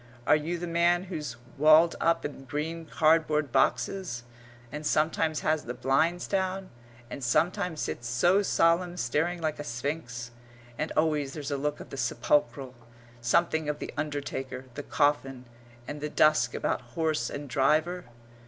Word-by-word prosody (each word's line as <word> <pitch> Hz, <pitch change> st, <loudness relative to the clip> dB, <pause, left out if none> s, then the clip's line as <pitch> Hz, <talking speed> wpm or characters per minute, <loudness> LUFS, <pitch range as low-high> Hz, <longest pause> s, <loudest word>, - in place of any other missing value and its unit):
Are -, -, +6 dB
you 160 Hz, +3 st, -2 dB
the 175 Hz, -, -4 dB
man 170 Hz, +1 st, +2 dB
who's 155 Hz, -9 st, -5 dB, 0.2 s
walled 155 Hz, +3 st, +6 dB
up 165 Hz, 0 st, +2 dB
in 140 Hz, -2 st, -6 dB
green 160 Hz, +4 st, -4 dB
cardboard 155 Hz, -3 st, +2 dB
boxes, 135 Hz, 0 st, 0 dB, 0.5 s
and 150 Hz, +1 st, -6 dB
sometimes 155 Hz, +1 st, +1 dB
has 155 Hz, 0 st, 0 dB
the 120 Hz, +1 st, -5 dB
blinds 140 Hz, +8 st, +1 dB
down, 190 Hz, -1 st, -2 dB, 0.4 s
and 140 Hz, -, -6 dB
sometimes 175 Hz, -, +1 dB
sits 120 Hz, -, -4 dB
so 175 Hz, +12 st, +3 dB
solemn 175 Hz, -2 st, +2 dB
staring 165 Hz, +6 st, 0 dB
like 155 Hz, -2 st, -2 dB
a -, -, -3 dB
sphinx, 120 Hz, -2 st, -4 dB, 0.4 s
and 155 Hz, +6 st, -3 dB
always 150 Hz, -3 st, +1 dB
there's 150 Hz, -1 st, -5 dB
a -, -, +1 dB
look 150 Hz, +1 st, -2 dB
of -, -, -11 dB
the 140 Hz, -, -6 dB
sepulchral, 135 Hz, -2 st, 0 dB, 0.5 s
something 160 Hz, +5 st, +1 dB
of 150 Hz, -, -1 dB
the -, -, -7 dB
undertaker, 140 Hz, -3 st, -4 dB
the 145 Hz, -, -5 dB
coffin, 140 Hz, -4 st, 0 dB, 0.4 s
and 145 Hz, 0 st, -6 dB
the 150 Hz, -, -2 dB
dusk 155 Hz, +1 st, +3 dB
about -, -, -1 dB, 0.2 s
horse 155 Hz, -7 st, 0 dB
and 145 Hz, 0 st, -6 dB
driver? 155 Hz, +8 st, +1 dB
150 Hz, 155 wpm, -28 LUFS, 135-165 Hz, 0.5 s, Are